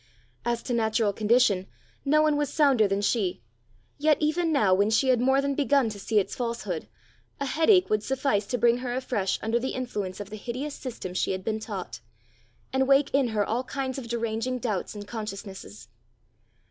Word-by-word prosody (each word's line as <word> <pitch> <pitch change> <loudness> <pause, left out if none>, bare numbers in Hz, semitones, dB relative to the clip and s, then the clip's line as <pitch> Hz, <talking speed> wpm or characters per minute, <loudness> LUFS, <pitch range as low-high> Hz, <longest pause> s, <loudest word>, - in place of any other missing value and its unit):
As 235 -1 -1
to 250 - -3
natural 220 -2 +1
condition, 210 -3 +3 0.4
no 305 +2 +4
one 305 -1 +3
was 290 -1 -1
sounder 275 -8 +4
than 195 +1 0
she; 195 - 0 0.6
yet 300 0 +4
even 320 +2 +1
now 210 -11 +3
when 200 +3 +3
she 240 +4 +2
had 250 -2 +3
more 265 +2 +3
than 280 0 0
begun 280 -3 +2
to 205 -2 -7
see 215 +2 -1
its 200 - +1
falsehood, 230 -9 -3 0.5
a 280 - -1
headache 330 +7 +4
would 215 -1 +2
suffice 255 -5 0
to 245 - -1
bring 235 +1 +3
her 245 -1 -3
afresh 240 -7 -1
under 225 +2 +1
the 260 +2 -3
influence 210 -7 -4
of 205 0 -7
the 215 - -6
hideous 255 +7 -5
system 235 -10 -6
she 185 - 0
had 185 0 -5
been 220 +1 -1
taught, 220 - -6 0.7
and 265 0 +2
wake 275 0 +4
in 275 -2 +3
her 215 -3 0
all 235 +4 -1
kinds 265 0 -3
of 245 - -8
deranging 230 +1 -2
doubts 215 -5 -3
and 205 0 -8
consciousnesses. 195 - -7
235 Hz, 190 wpm, -27 LUFS, 210-270 Hz, 0.7 s, no